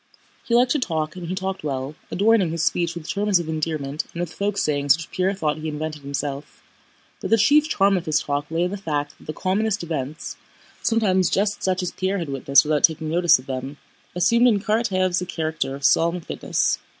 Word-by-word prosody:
He 235 - 0
liked 245 +1 +4
to 300 - +2
talk 160 -8 -2
and 180 -2 -7
he 185 - -3
talked 190 -1 -4
well, 135 -1 -3 0.2
adorning 205 -2 +3
his 165 0 -1
speech 170 +1 0
with 170 -2 -8
terms 205 -1 +2
of 170 -2 -4
endearment 155 -2 -2
and 170 - -8
with 175 -1 -3
folk 200 0 -2
sayings 145 -4 +2
which 165 - -9
Pierre 190 +2 0
thought 155 -5 -1
he 155 - -5
invented 155 0 -4
himself, 140 0 -5 0.6
but - - -5
the 225 - +5
chief 295 +8 +4
charm 195 -5 +3
of 175 -3 -3
his 155 0 +2
talk 145 -1 -3
lay 165 +2 0
in 180 - -1
the 200 - -3
fact 145 -6 -3
that - - -18
the - - -2
commonest 200 +2 -1
events—sometimes 175 - -2
just 205 +1 0
such 185 0 0
as 180 - -2
Pierre 190 +1 -1
had 170 -5 -4
witnessed 140 0 +4
without 150 -1 0
taking 160 -1 +2
notice 175 0 +5
of 130 - -13
them—assumed 145 - -1
in 215 -4 +3
Karatáev's 195 -4 +1
a - - -3
character 160 -5 -2
of 140 0 -5
solemn 170 +5 +3
fitness. - - -1
170 Hz, 205 wpm, -23 LUFS, 150-195 Hz, 0.6 s, the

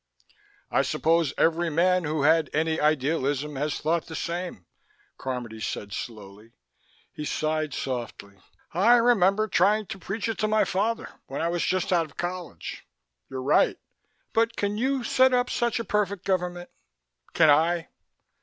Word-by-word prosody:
"I - - +3
suppose 165 -3 +1
every 165 +1 +2
man 180 +2 +2
who 150 -1 -1
had 160 +1 +4
any 160 +1 +1
idealism 150 -1 0
has 150 +2 -1
thought 165 +1 0
the 160 - -7
same," 170 - -4 0.5
Carmody 120 -4 -5
said 100 -1 -4
slowly. 105 0 -8 0.6
He 150 - -6
sighed 155 0 -1
softly. 115 -6 -5 0.3
"I 205 +8 +5
remember 215 -3 +3
trying 215 0 +3
to 195 - -8
preach 195 +6 -3
it 225 - -3
to 215 - +1
my 215 0 +3
father 225 +5 -1 0.2
when 135 - -5
I 165 - 0
was 175 0 -1
just 185 0 0
out 165 -2 +2
of 145 - -22
college. 180 0 -5 0.5
You're 130 -1 -5
right. 140 - +3 0.6
But 230 0 +2
can 205 0 -1
you 260 +3 0
set 260 +2 +4
up 245 0 +1
such 240 -1 0
a - - -2
perfect 200 -1 -1
government? 180 -2 -2 0.6
Can 160 -2 +6
I? 165 +3 +2
170 Hz, 155 wpm, -26 LUFS, 150-200 Hz, 0.6 s, Can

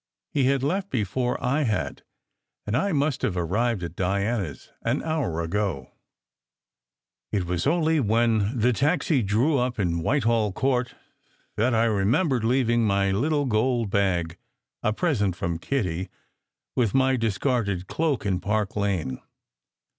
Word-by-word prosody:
He 140 -3 +2
had 135 0 +2
left 190 +7 -1
before 125 +2 -1
I 135 +5 +2
had, 110 -7 -1 0.6
and 105 - -1
I 195 +9 +1
must 145 -3 0
have 95 - -1
arrived 100 +4 0
at 85 0 -6
Diana 100 +2 0
s - - -14
an - - -1
hour 150 - -1
ago. 85 -6 -2 1.4
It 100 -4 0
was 90 +6 -1
only 160 0 +2
when 115 -1 +2
the 120 +2 +3
taxi 145 +1 +1
drew 120 +8 +2
up 125 0 -1
in 85 -5 0
Whitehall 115 - +1
Court 125 0 0 0.6
that 115 +3 +2
I 110 - +3
remembered 115 - +1
leaving 120 -1 +2
my 100 -2 +2
little 145 +8 +1
gold 115 -2 +1
bag 90 -5 0 0.4
a 110 - +1
present 105 - 0
from 85 -1 -3
Kitty 95 -6 -2 0.7
with 120 -3 +1
my 130 0 +4
discarded 110 -4 0
cloak 150 -1 -1
in 95 -3 0
Park 105 +1 -1
Lane. 95 -11 -1
115 Hz, 140 wpm, -25 LUFS, 100-130 Hz, 1.4 s, my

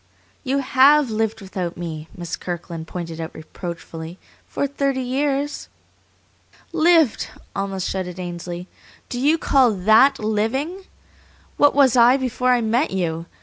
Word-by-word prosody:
"You 270 0 0
HAVE 275 0 +4
lived 220 0 -1
without 185 -3 -5
me," 160 -2 -6
Miss 175 -2 -4
Kirkland 170 -2 -6
pointed 165 -2 -6
out 160 - -7
reproachfully, 165 +1 -8 0.3
"for - - -2
thirty 275 -1 -1
years." 280 +3 -2 1.0
"Lived!" 330 -5 +3 0.3
almost 195 -2 -2
shouted 185 -1 -4
Ainsley. 175 0 -6 0.4
"Do 245 - -4
you 295 +5 +3
call 265 -6 +3
THAT 220 +8 +5
living? 260 - -2 0.7
What 290 0 +4
was 270 -3 +5
I 245 +2 +6
before 255 -1 -1
I 250 -1 +4
met 235 +6 +1
you? 165 -3 -2
220 Hz, 130 wpm, -21 LUFS, 175-275 Hz, 1.0 s, I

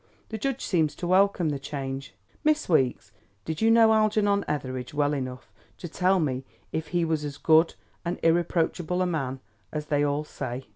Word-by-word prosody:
The 220 - -5
judge 270 +2 -2
seems 160 -6 +1
to - - -5
welcome 185 -2 +3
the 145 -2 -2
change. 135 -4 -5 0.3
Miss 310 0 +2
Weeks, 130 - +1 0.3
did 160 -1 -4
you 225 - +4
know 225 -1 +6
Algernon 210 -2 +2
Etheridge 130 -2 -4
well 145 0 +2
enough 130 -2 -5 0.3
to 175 - -7
tell 185 +3 +2
me 135 -5 -1 0.3
if 160 0 -3
he 175 +1 0
was 160 -2 -1
as 145 -2 -5
good 160 +1 +4 0.3
and 175 0 -2
irreproachable 175 +1 +1
a - - +1
man 135 -7 -2 0.3
as 150 -1 -4
they 145 -1 +1
all 145 +1 0
say?" 130 -3 -6
160 Hz, 180 wpm, -26 LUFS, 140-185 Hz, 0.3 s, know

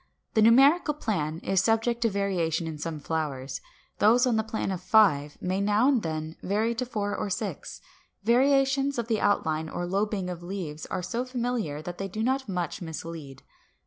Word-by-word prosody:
The 220 - +3
numerical 275 +8 +5
plan 160 - -2
is 190 -1 +2
subject 225 +3 +1
to 230 - +3
variation 180 -5 0
in 160 -2 -5
some 160 0 -4
flowers; 145 -4 -3 0.4
those 235 +4 +5
on 245 -3 +2
the 220 - +3
plan 220 -2 -3
of 185 -2 -4
five 180 -8 +3
may 185 +2 -1
now 210 +5 +3
and 270 -5 +3
then 155 -1 -4
vary 215 +4 0
to 240 +2 -3
four 205 -4 -2
or - - -2
to 190 - 0
six. - - -6 0.4
Variations 270 +3 +3
of 235 -1 -2
the 225 -2 0
outline 160 -6 +1
or 175 - -3
lobing 195 +1 -1
of 175 -2 -5
leaves 175 -4 -6
are 180 - -3
so 235 +7 -2
familiar 240 - -3
that 175 +2 -7
they 195 - -2
do 215 +4 -4
not 265 0 0
much 180 -3 -3
mislead. 160 -4 -7
200 Hz, 185 wpm, -27 LUFS, 165-235 Hz, 0.4 s, numerical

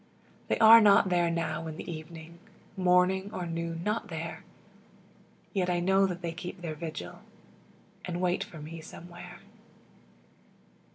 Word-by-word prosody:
They - - +1
are 225 +1 +9
not 200 -2 +5
there 175 -1 +2
now 165 -1 -2
in 160 -1 -7
the - - -8
evening 165 0 -9 0.4
Morning 185 +1 +3
or 180 -4 -4
noon 165 0 -4
not 215 +2 -1
there; 165 -2 -6 1.1
Yet 185 -4 0
I 175 -1 +1
know 190 +2 +3
that 180 -1 -6
they 170 - -2
keep 180 +2 -7
their 165 -3 -4
vigil, 155 - -7 0.9
And 175 -1 -4
wait 180 0 +1
for 165 - -12
me 160 +2 -8
Somewhere. 175 +2 -11
175 Hz, 140 wpm, -29 LUFS, 165-185 Hz, 1.1 s, are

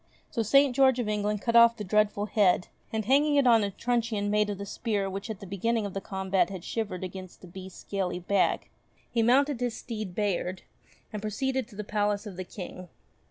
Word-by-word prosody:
So 235 - -1
St. 275 +4 +4
George 265 -2 +5
of 240 -3 -1
England 210 -1 -1
cut 230 -1 0
off 235 0 +7
the 210 - -4
dreadful 205 +1 +1
head 195 -4 +2 0.2
and 220 -1 -2
hanging 290 +5 +3
it 280 -2 +4
on 230 -3 +5
a 200 - 0
truncheon 225 -1 -1
made 210 0 +2
of 205 - -3
the 200 - -6
spear 205 -1 -2
which 195 +3 -5
at 215 -3 -5
the - - -7
beginning 210 +4 -1
of 200 - -5
the 195 - -3
combat 190 -1 0
had 190 -3 -7
shivered 205 -5 -3
against 185 0 -8
the 185 - -11
beast's 185 +1 -10
scaly 190 -3 -2
back, 185 +2 0 0.4
he 235 - +1
mounted 265 +3 +3
his 245 -2 -2
steed 215 -6 -6
Bayard, 190 -3 -1 0.5
and 210 - -4
pro 215 - -3
ceeded 265 +2 -1
to 225 - -15
the 210 - -4
palace 205 0 -1
of 200 -3 -7
the 185 - -5
King. 180 -1 -9
210 Hz, 215 wpm, -28 LUFS, 195-235 Hz, 0.5 s, off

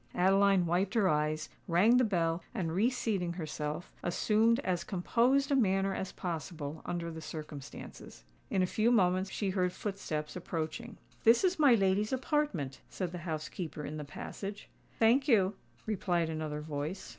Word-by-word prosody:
Adeline 195 0 +4
wiped 180 +5 0
her 210 -4 +4
eyes, 155 -1 0 0.2
rang 200 +8 +5
the 255 - +5
bell, 170 -5 +1
and 165 -4 -1
reseating 205 -4 0
herself, 155 -1 -4
assumed 220 +6 +2
as 180 -2 -1
composed 245 - +2
a - - +4
manner 195 -5 +2
as 190 0 -4
possible 160 -3 -5
under 170 -1 -3
the 160 0 -7
circumstances. 150 - -9 0.3
In 190 - +2
a - - +4
few 215 +5 +1
moments 185 -3 +3
she 195 -1 -2
heard 180 -1 +1
footsteps 180 -6 -4
approaching. 180 +6 -4 0.3
"This 230 +6 +6
is 370 -2 +2
my 280 -5 +7
lady's 195 +1 +2
apartment," 260 - -1
said 180 -3 -3
the 175 - -6
housekeeper 155 0 -4
in 155 - -5
the 150 - -4
passage. 195 +7 -7 0.3
"Thank 245 +5 +4
you," 205 -7 +4 0.3
replied 175 -6 0
another 155 -1 -3
voice. 150 +4 -4
185 Hz, 155 wpm, -32 LUFS, 160-215 Hz, 0.3 s, my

